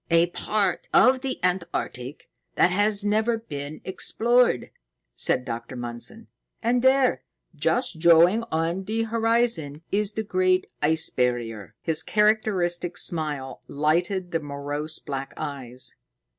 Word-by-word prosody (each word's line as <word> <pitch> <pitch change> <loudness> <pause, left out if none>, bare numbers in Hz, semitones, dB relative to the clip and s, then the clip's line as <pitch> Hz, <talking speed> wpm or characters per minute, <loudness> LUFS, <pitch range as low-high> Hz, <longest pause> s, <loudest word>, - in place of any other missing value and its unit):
"A 170 +1 +3
part 200 -2 -1
of 255 0 +5
the 265 -1 -3
Antarctic 170 -7 -2 0.3
that 180 - +4
has 205 +2 +2
never 220 +3 +2
been 145 -8 -7
explored," 235 - +1 0.4
said 125 - +1
Dr. 115 +2 -6
Mundson; 120 - -4 0.4
"and 240 +2 +2
there, 260 0 +3 0.3
just 195 -10 -1
showing 170 +6 +6
on 165 +4 -1
the 225 +2 -1
horizon, 225 -10 0
is 210 0 +1
the 220 - -2
Great 185 -2 +1 0.2
Ice 160 +1 +1
Barrier." 120 -4 -2
His 160 -2 +1
characteristic 195 -5 +1
smile 150 -5 -1
lighted 175 +5 0
the 165 - 0
morose 145 +1 -3
black 135 -1 -6
eyes. 130 -4 -7
175 Hz, 120 wpm, -25 LUFS, 145-215 Hz, 0.4 s, showing